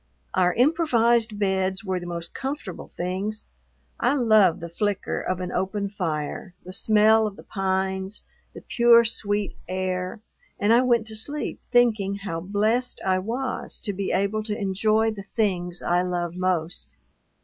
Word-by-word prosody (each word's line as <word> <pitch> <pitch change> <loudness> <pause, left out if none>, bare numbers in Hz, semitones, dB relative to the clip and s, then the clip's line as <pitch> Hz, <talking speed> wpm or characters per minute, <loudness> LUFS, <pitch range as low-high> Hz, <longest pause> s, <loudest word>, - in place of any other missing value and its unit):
Our 180 -1 +2
improvised 240 -6 +3
beds 190 -1 0
were 190 -2 -1
the 175 - -8
most 170 -1 -5
comfortable 265 - -5
things; 190 +5 -4 0.5
I - - +2
love 215 - +4
the 170 - -6
flicker 200 +3 -2
of 185 -1 -2
an 180 -1 -4
open 200 +1 -2
fire, 170 -1 -4
the 185 - -8
smell 215 +2 +4
of 205 - -7
the - - -13
pines, 190 0 -2 0.3
the - - -8
pure, 235 -1 +6
sweet 205 -2 -1
air, 185 +1 -2 0.4
and 210 +3 +4
I 240 - +6
went 240 -3 +2
to 220 0 -5
sleep 285 +7 +1
thinking 220 -5 +3
how 195 -5 -4
blest 215 +7 0
I 185 -1 +2
was 245 +6 -3
to 205 - -2
be 195 0 -2
able 200 +3 0
to 210 -1 -2
enjoy 215 +2 +1
the 210 -2 -7 0.2
things 180 -5 0
I 175 +1 +2
love 175 -2 -2
most. 180 -2 -2
200 Hz, 155 wpm, -25 LUFS, 185-220 Hz, 0.5 s, pure